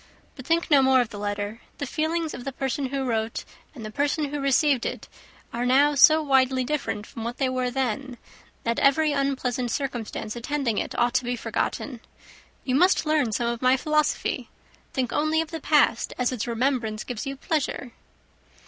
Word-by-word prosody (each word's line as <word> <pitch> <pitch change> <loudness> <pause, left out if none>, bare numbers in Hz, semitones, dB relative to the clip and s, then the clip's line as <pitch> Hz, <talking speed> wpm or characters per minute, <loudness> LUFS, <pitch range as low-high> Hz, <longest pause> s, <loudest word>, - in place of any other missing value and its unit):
But 255 -1 -11
think 330 0 +1
no 285 -2 +7
more 265 0 +5
of 245 -3 +1
the 205 - -8
letter. 205 +2 -3 0.2
The 285 - -3
feelings 320 +3 -1
of 245 - -7
the 275 - -4
person 270 +1 -2
who 270 0 -2
wrote 225 -2 -2 0.3
and 225 -5 -8
the 215 - -6
person 285 +3 0
who 295 - -2
received 275 -1 +2
it - - -4 0.5
are 235 +1 -2
now 275 +4 +4
so 310 +3 +6
widely 260 -2 +3
different 250 -6 -2
from 225 - -8
what 235 +1 -4
they 265 -2 +1
were 255 -1 -1
then, 255 0 -2 0.5
that 230 0 0
every 300 +3 +4
unpleasant 265 -3 -1
circumstance 235 -4 -4
attending 240 -2 -1
it - - -4
ought 240 0 +2
to 255 0 +2
be 245 0 -1
forgotten. 245 +2 -3 0.6
You 255 - -1
must 355 +5 +4
learn 305 -7 +2
some 235 +3 -1
of 235 0 -2
my 255 +1 +4
philosophy. 305 +2 0 0.4
Think 255 -2 -2
only 310 +1 +1
of 325 0 -2
the 325 -2 -5
past 290 -7 +3
as 250 0 +1
its 245 -2 -3
remembrance 235 -3 -1
gives 245 0 -5
you 275 - -3
pleasure." 280 -4 -2
260 Hz, 185 wpm, -25 LUFS, 240-290 Hz, 0.6 s, no